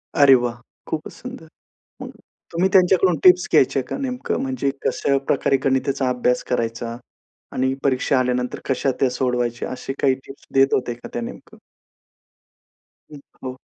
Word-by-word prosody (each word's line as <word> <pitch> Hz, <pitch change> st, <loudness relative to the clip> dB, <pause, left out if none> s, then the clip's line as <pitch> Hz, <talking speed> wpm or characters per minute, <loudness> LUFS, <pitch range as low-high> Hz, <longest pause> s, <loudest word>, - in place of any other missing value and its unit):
अरे 140 Hz, -2 st, +7 dB
वाह! 120 Hz, -1 st, 0 dB, 0.3 s
खूपच 155 Hz, -1 st, -4 dB
सुंदर. 250 Hz, -10 st, -10 dB, 0.6 s
मग -, -, -6 dB, 0.4 s
तुम्ही 175 Hz, +3 st, +2 dB
त्यांच्याकडून 185 Hz, -1 st, +4 dB
टिप्स 180 Hz, 0 st, +7 dB
घ्यायच्या 135 Hz, +1 st, +4 dB
का -, -, -3 dB
नेमकं? 255 Hz, -2 st, -2 dB
म्हणजे 135 Hz, +1 st, -1 dB, 0.2 s
कशा 140 Hz, -, +1 dB
प्रकारे 140 Hz, -1 st, +2 dB
गणिताचा 135 Hz, 0 st, +1 dB
अभ्यास 125 Hz, 0 st, +1 dB
करायचा 115 Hz, -1 st, -2 dB, 0.6 s
आणि 130 Hz, +1 st, 0 dB
परीक्षा 135 Hz, 0 st, +2 dB
आल्यानंतर 125 Hz, 0 st, -1 dB
कशा 135 Hz, 0 st, +1 dB
त्या 135 Hz, -, +3 dB
सोडवायच्या, 125 Hz, -2 st, -1 dB
असे 130 Hz, +1 st, -5 dB
काही 135 Hz, -2 st, +4 dB
टिप्स 135 Hz, -, -13 dB
देत 135 Hz, 0 st, +4 dB
होते 125 Hz, -2 st, -1 dB
का 120 Hz, -, -11 dB
त्या 120 Hz, -, -3 dB
नेमकं? 115 Hz, -, -9 dB, 1.6 s
हं, 145 Hz, -, -9 dB, 0.2 s
हो. 130 Hz, 0 st, -5 dB
130 Hz, 145 wpm, -22 LUFS, 125-145 Hz, 1.6 s, अरे